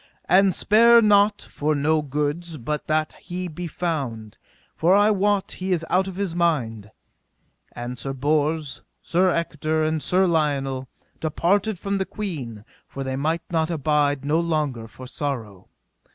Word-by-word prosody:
And 190 +1 +4
spare 235 +3 +6
not 210 -1 +4
for 150 +1 -2
no 155 +2 +2
goods 150 +4 -3
but 150 +4 -4
that 155 0 0
he 180 +1 -5
be 175 +1 -6
found, 135 -11 -4 0.4
for 175 +4 +3
I 205 +1 +5
wot 205 -1 +1
he 185 0 -2
is 165 -2 -1
out 190 +1 +3
of 190 - -6
his 195 -3 -2
mind. 125 - 0 0.8
And 120 +1 -6
Sir 135 +3 -3
Bors, 145 +1 -1 0.2
Sir 185 +2 +2
Ector, 155 -2 -1
and 155 0 0
Sir 185 +4 +2
Lionel 140 -6 0 0.3
departed 185 +6 0
from 200 +2 -2
the 190 - -2
queen, 135 - -6 0.2
for 135 - -6
they 130 0 -3
might 160 +5 -1
not 160 -1 +1
abide 145 -3 +1
no 155 +3 +2
longer 150 -9 -1
for 130 +3 -12
sorrow. 125 - -5
155 Hz, 150 wpm, -23 LUFS, 140-180 Hz, 0.8 s, spare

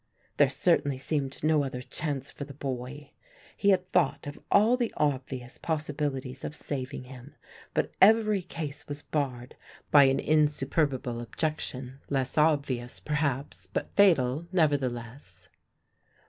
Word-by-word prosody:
There 145 -2 +5
certainly 140 -1 +2
seemed 135 0 -3
no 155 -1 +3
other 125 -2 -5
chance 145 -3 -4
for - - -7
the 140 -1 -10
boy; 135 +1 -5 0.4
he 200 - +2
had 185 -2 +3
thought 150 -5 +2
of 145 0 -7
all 220 +5 +5
the 240 -3 -1
obvious 130 -4 -2
possibilities 145 -4 -3
of 150 - -5
saving 135 -2 -5
him, 125 +2 -12 0.4
but - - +1
every 215 -1 +5
case 150 -5 -6
was 145 0 -5
barred 130 -4 -3 0.4
by 145 -2 +8
an 135 0 +3
insuperable 145 -4 +1
objection 135 0 -4
less 135 -2 -1
obvious, 140 -6 +1
perhaps, 140 - -2
but - - -4
fatal 165 -6 +3
nevertheless. 135 -7 -1
145 Hz, 130 wpm, -28 LUFS, 130-155 Hz, 0.4 s, by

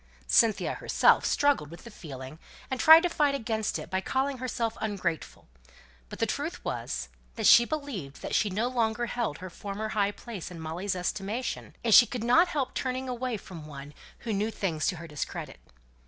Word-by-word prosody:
Cynthia 215 - +3
herself - - +3
struggled 285 - +2
with 170 - -12
the 235 - -11
feeling, 140 -5 -9 0.3
and 260 - -2
tried 325 +1 +9
to - - +3
fight 295 -4 +2
against 220 -4 -2
it - - -9
by 190 0 0
calling 265 +5 -1
herself 235 -3 -2
"ungrateful;" 190 -7 -3 0.6
but - - -8
the - - +1
truth - - -4
was, - - -3 0.3
she 235 - +8
believed 240 - -5
that - - -4
she 210 - +2
no 215 +6 0
longer 240 -2 0
held 235 -10 -2
her 185 +1 -8
former 205 +4 -5
high 205 -2 +1
place 205 -4 -8
in 175 -2 -9
Molly's 170 +5 -3
estimation 205 +6 -3
and 230 -2 +3
she 240 - +9
could 245 -3 -4
not 285 +10 +5
help 290 -6 -2
turning 260 0 -2
away 250 -1 -2
from 165 -6 -10
one 145 0 -9 0.3
who 225 - -1
knew 205 +2 0
things 170 -8 -2
to 185 - 0
her 165 0 -9
discredit. 150 -3 -6
220 Hz, 185 wpm, -28 LUFS, 180-250 Hz, 0.6 s, tried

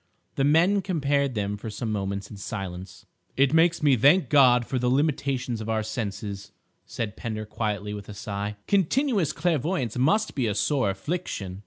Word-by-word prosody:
The 135 - 0
men 170 +8 +4
compared 140 -7 0
them 105 -1 -2
for 110 - -7
some 110 +1 -4
moments 100 -1 -3
in 105 - -9
silence. 95 -3 -7 0.3
"It 135 +1 +3
makes 165 0 +3
me 140 -3 +5
thank 145 - +4
God 125 -5 +5
for 130 - -2
the 125 0 +1
limitations 135 -4 0
of 110 - -6
our 110 -1 0
senses," 100 -2 -5 0.4
said 110 -2 -4
Pender 110 -3 -5
quietly, 105 -1 -3
with 105 0 -8
a 105 - -8
sigh; 100 0 -4
"continuous 200 - +1
clairvoyance 150 - -1
must 210 +12 +2
be 130 -5 0
a 105 - -1
sore 130 -1 +1
affliction." 95 - -4
120 Hz, 170 wpm, -26 LUFS, 105-150 Hz, 0.4 s, me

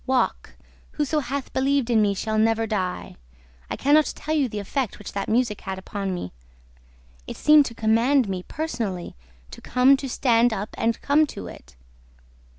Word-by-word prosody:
Walk! 260 -1 0 0.4
Whoso 300 +1 0
hath 275 0 -5
believed 270 -2 +1
in 225 -2 +4
me 200 -1 +2
shall 215 +2 -1
never 225 0 +2
die! 190 -4 -3 0.3
...' 60 +1 -30
I - - -2
can 285 +2 +1
not 305 0 +4
tell 310 - -4
you 285 -5 +1
the 210 - -6
effect 220 +4 -3
which 210 - -9
that 200 - -3
music 225 -2 0
had 190 -1 -5
upon 195 0 -4
me. 175 - -5 1.0
It - - -7
seemed 300 -1 +5
to 230 - -9
command 230 +4 +2
me, 190 -2 -3
personally, 225 - -4 0.4
to - - -11
come, 255 +2 +4
to 270 0 -6
stand 240 -2 +2
up 205 +1 -4
and 225 0 0
come 300 +2 +3
to - - -8
it. - - -12
230 Hz, 180 wpm, -24 LUFS, 205-275 Hz, 1.0 s, seemed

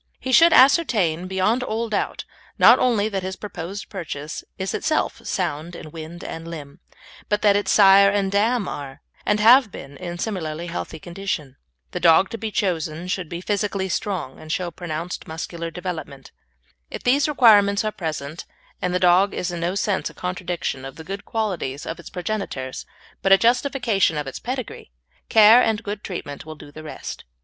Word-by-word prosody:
He 260 - -4
should 335 +6 +7
ascertain 215 - +4
beyond 190 +6 +1
all 230 -1 -2
doubt, 210 -2 -2 0.3
not - - +7
only 225 -5 +2
that 195 -2 -2
his 185 0 -4
proposed 195 -1 -7
purchase 155 -6 -6
is 190 0 -3
itself 315 -1 -1
sound 155 +4 -2
in 155 - -9
wind 165 +2 -9
and 165 0 -7
limb, 150 -2 -9 0.5
but 210 0 0
that 205 -1 +5
its 205 - 0
sire 200 -1 +7
and 200 -1 0
dam 215 +2 +1
are, 140 0 -7 0.2
and 210 - +2
have 235 +1 +6
been, 140 -3 -10
in 175 -1 -6
similarly 170 -5 -3
healthy 90 - -5
condition. 170 -5 -5 0.4
The - - -3
dog 170 +2 +5
to 230 - -5
be 220 +1 -3
chosen 170 -4 -2
should 185 -4 -2
be 170 0 -5
physically 200 -1 -1
strong 185 -8 -3
and 155 - -8
show 175 +1 -2
pronounced 170 0 -5
muscular 165 +1 -5
development. 160 -6 -7 0.6
If - - -7
these 275 +4 +3
requirements 210 -8 +5
are 215 - 0
present 155 -3 -5 0.4
and 180 0 -1
the - - +2
dog 185 +2 +4
is 180 - -2
in 175 - -4
no 175 +3 -1
sense 200 -1 0
a - - -16
contradiction 180 -6 -3
of 135 0 -8
the 160 - -9
good 195 +4 -7
qualities 180 -11 -3
of 165 - -5
its - - -10
progenitors, 180 -9 -4 0.3
but 195 - +1
a 195 - +9
justification 235 - +2
of 150 - -2
its 135 - -6
pedigree, 255 -1 -5 0.4
care 220 +2 +8
and 220 -1 0
good 205 0 -5
treatment 145 -6 -6
will 155 0 -9
do 145 -1 -13
the 155 - -10
rest. 155 - -7
185 Hz, 180 wpm, -22 LUFS, 160-210 Hz, 0.6 s, a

